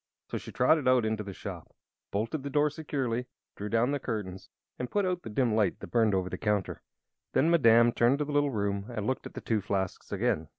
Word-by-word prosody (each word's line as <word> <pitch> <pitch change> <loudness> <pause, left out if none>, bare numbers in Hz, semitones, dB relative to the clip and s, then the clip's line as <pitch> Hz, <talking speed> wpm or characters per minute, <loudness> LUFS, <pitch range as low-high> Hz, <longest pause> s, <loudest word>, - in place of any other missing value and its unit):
So - - -2
she - - -9
trotted 140 +2 +3
out 130 -3 +4
into 110 0 -1
the 100 -1 -6
shop, - - -8 0.3
bolted 115 +9 -2
the 140 - -5
door 150 +1 +2
securely, 130 -6 -2 0.3
drew 105 +1 -5
down 115 +4 +2
the 145 - 0
curtains, 105 -7 -5 0.3
and 125 - -3
put 205 -1 +1
out 180 -1 -1
the - - -8
dim 115 +1 +1
light 105 -4 +2
that - - -9
had - - -28
burned 110 -4 +3
over 95 -1 0
the - - -5
counter. 105 -3 -1 0.5
Then 160 +5 +3
Madame 120 -7 +6
returned 120 +3 +3
to 150 - -1
the 150 - -5
little 145 0 +2
room 100 -4 -1
and 110 -4 -4
looked 130 +2 -2
at - - -16
the - - -5
two 110 -2 0
flasks 95 -1 -3
again. 80 0 0
115 Hz, 230 wpm, -29 LUFS, 105-140 Hz, 0.5 s, Madame